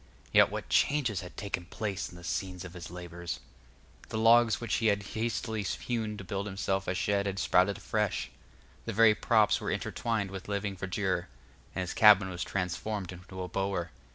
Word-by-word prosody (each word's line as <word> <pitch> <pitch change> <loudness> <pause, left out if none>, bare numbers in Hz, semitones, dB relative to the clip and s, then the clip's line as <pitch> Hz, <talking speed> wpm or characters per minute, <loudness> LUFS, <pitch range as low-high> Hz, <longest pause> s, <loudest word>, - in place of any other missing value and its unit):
Yet - - +7
what - - -5
changes 125 -9 +2
had 90 - -11
taken 100 -3 -3
place 100 +1 -3
in - - -13
the 85 - -12
scene 90 +1 -3
of 90 - -9
his 90 -1 -8
labors! 85 -2 -6 0.7
The - - -3
logs 115 -1 +5
which 120 -3 -1
he 115 - +1
had 100 -1 +2
hastily 110 +1 -2
hewn 110 +1 -2
to 100 - -7
build 100 +1 -3
himself 95 -1 -1
a 90 - 0
shed 100 +2 +1
had 100 0 -2
sprouted 95 +1 +3
afresh; 105 -2 -1 0.5
the - - -3
very 110 +1 +6
props 110 -1 +3
were - - -2
intertwined 110 -4 -1
with 95 -1 -7
living 100 -1 -2
verdure, 95 -1 -1 0.5
and - - -1
his 90 - -3
cabin 105 -3 +7
was 90 0 -3
transformed 95 +1 -3
into 90 +1 -8
a - - -4
bower. 95 -1 -2
100 Hz, 180 wpm, -30 LUFS, 90-105 Hz, 0.7 s, Yet